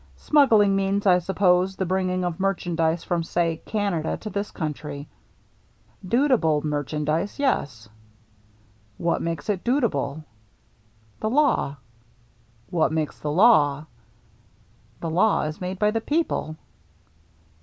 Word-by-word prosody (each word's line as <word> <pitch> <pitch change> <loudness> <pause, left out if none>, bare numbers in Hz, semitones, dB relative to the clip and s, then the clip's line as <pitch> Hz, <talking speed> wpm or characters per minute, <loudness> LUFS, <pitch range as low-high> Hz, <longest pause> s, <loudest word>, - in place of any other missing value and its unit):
Smuggling 220 -10 +4
means, 195 +1 0
I 180 -2 +5
suppose, 185 0 +2
the 190 - -2
bringing 185 0 -1
of 175 -1 -3
merchandise 175 -4 0
from, 175 -1 -1
say, 165 0 -1
Canada 200 -7 -1
to 215 - -6
this 200 0 -3
country." 150 -3 -5 0.5
" 110 0 -36
Dutiable 180 - +2
merchandise, 150 +4 -2
yes." 140 - -1 0.6
" 105 0 -34
What 170 - +1
makes 165 -1 -4
it 200 -4 -1
dutiable? 225 - 0 0.4
" - - -38
" 110 0 -35
The 215 - 0
law." 260 - +2 0.5
" 115 0 -35
What 160 -3 +2
makes 155 -2 -2
the 150 - -4
law? 150 -7 +4 0.4
" - - -34
" - - -34
The 165 - -3
law 195 +6 +2
is 155 +3 -5
made 185 +1 -4
by 210 +2 +2
the 225 +1 -1
people." 290 - -1
170 Hz, 140 wpm, -24 LUFS, 145-200 Hz, 0.6 s, I